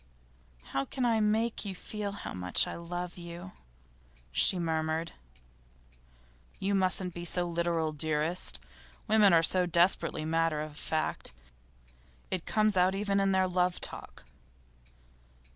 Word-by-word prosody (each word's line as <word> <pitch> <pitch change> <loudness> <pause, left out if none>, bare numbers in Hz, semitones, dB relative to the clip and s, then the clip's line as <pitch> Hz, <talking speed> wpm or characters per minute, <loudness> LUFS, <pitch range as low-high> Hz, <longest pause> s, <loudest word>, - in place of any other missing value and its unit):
'How 135 - -2
can 255 - -2
I 230 -2 +3
make 220 +2 +1
you 195 -3 -5
feel 205 +2 -5
how - - -7
much 90 -1 +4
I - - -5
love 175 +1 -6
you?' 175 +2 -8 0.8
she 180 - +4
murmured. 160 -1 -1 1.5
'You 200 +1 -1
mustn't 185 -1 +2
be 175 - -6
so 175 +1 +1
literal, 170 -2 0
dearest. 155 - -1 0.5
Women 210 -2 +5
are 165 -1 +5
so 180 +2 +3
desperately 170 -2 +2
matter 165 -1 +1
of 150 -1 -6
fact; 155 - -2 1.0
it 185 -3 -3
comes 215 -1 +2
out 185 +1 +3
even 200 0 0
in 195 0 +2
their 190 0 +3
love 180 0 0
talk. - - -3
175 Hz, 130 wpm, -30 LUFS, 160-195 Hz, 1.5 s, Women